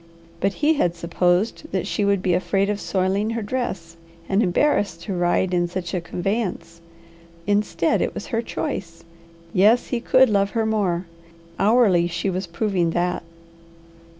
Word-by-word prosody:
But 195 +1 0
he 315 - +5
had 175 - 0
supposed 175 - 0
that - - -1
she 210 - -1
would 200 -1 +1
be 180 - +2
afraid 195 +3 +1
of 205 - -4
soiling 195 +3 0
her 230 -1 -2
dress, 195 -8 -4 0.3
and 195 +2 +2
embarrassed 190 - +1
to 200 - -4
ride 180 +1 +1
in 175 -1 +2
such 175 -1 -5
a 180 - -1
conveyance. 180 -1 -3 0.6
Instead 205 +1 +1
it - - -1
was - - -5
her 225 - +2
choice. 170 -7 -5 0.5
Yes, 215 +6 +4
he 245 - -1
could 260 +2 +4
love 200 -1 +2
her 225 - +2
more. 195 -5 0 0.5
Hourly 200 -5 +4
she 175 +3 -2
was 185 0 -3
proving 175 0 0
that. 180 +1 0
195 Hz, 155 wpm, -22 LUFS, 175-210 Hz, 0.6 s, he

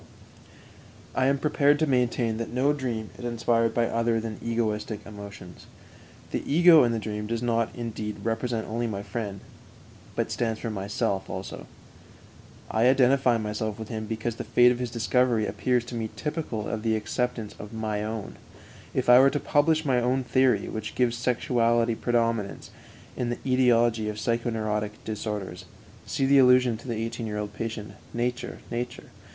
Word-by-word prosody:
I 130 - +2
am 140 +1 +3
prepared 145 0 +3
to 155 - +2
maintain 125 -4 +1
that 115 - -4
no 130 +4 +2
dream 120 -6 -3
is - - -8
inspired 115 -1 +1
by 120 - +3
other 115 0 +1
than 110 -1 -5
egoistic 110 -2 -2
emotions. 100 -4 -10 0.6
The - - -1
ego 165 -1 +7
in 120 - +2
the 115 - -1
dream 105 -1 -4
does 115 +1 -2
not, 115 -1 +1
indeed, 110 -3 -4
represent 115 0 -1
only 120 +2 -2
my 100 -2 -4
friend, 100 -4 -5 0.7
but - - -1
stands 115 -2 -1
for 115 - -3
myself 100 -1 -2
also. - - -6 1.0
I 110 +2 +3
identify 130 -2 +4
myself 105 0 -3
with 110 -1 -7
him 110 -2 -4
because 110 +1 -3
the - - -4
fate 125 0 +5
of 125 - -2
his 125 -1 -2
discovery 115 0 +2
appears 125 +3 0
to 125 - -9
me 110 -1 -2
typical 150 -9 -3
of 110 -2 -3
the 110 0 +1
acceptance 110 +1 -2
of 105 - -8
my 110 -2 -2
own. 110 -1 -5 0.6
If - - 0
I 125 0 +9
were 135 +1 +7
to 145 - -1
publish 155 +3 +2
my 130 -3 +2
own 130 +2 +1
theory, 125 -5 +2
which 110 -1 -5
gives 120 -2 +2
sexuality 120 -1 +1
predominance 115 -3 -1 0.4
in 120 - -2
the 120 - -1
ætiology 120 -4 +2
of 105 - -4
psychoneurotic 110 -2 -1
disorders 105 -4 -4 0.4
(see 135 - 0
the 140 +1 +6
allusion 125 -2 +5
to 115 - -13
the 120 - -2
eighteen 115 +1 -3
year 105 -1 -3
old 105 0 -4
patient 110 -1 -5
_"Nature, 120 +4 -4
Nature!" 120 +1 -5
115 Hz, 170 wpm, -26 LUFS, 110-125 Hz, 1.0 s, I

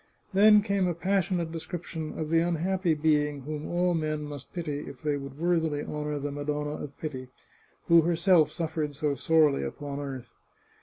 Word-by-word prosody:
Then 210 +1 +7
came 200 -2 +1
a 175 - -1
passionate 175 -1 0
description 160 -1 -6
of 155 0 -3
the 165 - +5
unhappy 175 +1 +1
being 150 -2 +1
whom 150 +2 -5
all 175 +1 +1
men 155 -2 -1
must 145 -3 -8
pity 155 -5 -3
if 135 - -11
they 150 -1 +1
would 140 -1 -7
worthily 160 -3 +1
honour 150 0 -3
the 145 0 -3
Madonna 145 +1 -2
of 140 -1 -9
Pity, 130 -5 -5 0.6
who 170 0 +7
herself 170 0 +3
suffered 155 -3 -3
so 145 0 0
sorely 150 0 +3
upon 145 -1 -5
earth. 135 -4 -6
155 Hz, 165 wpm, -28 LUFS, 145-170 Hz, 0.6 s, Then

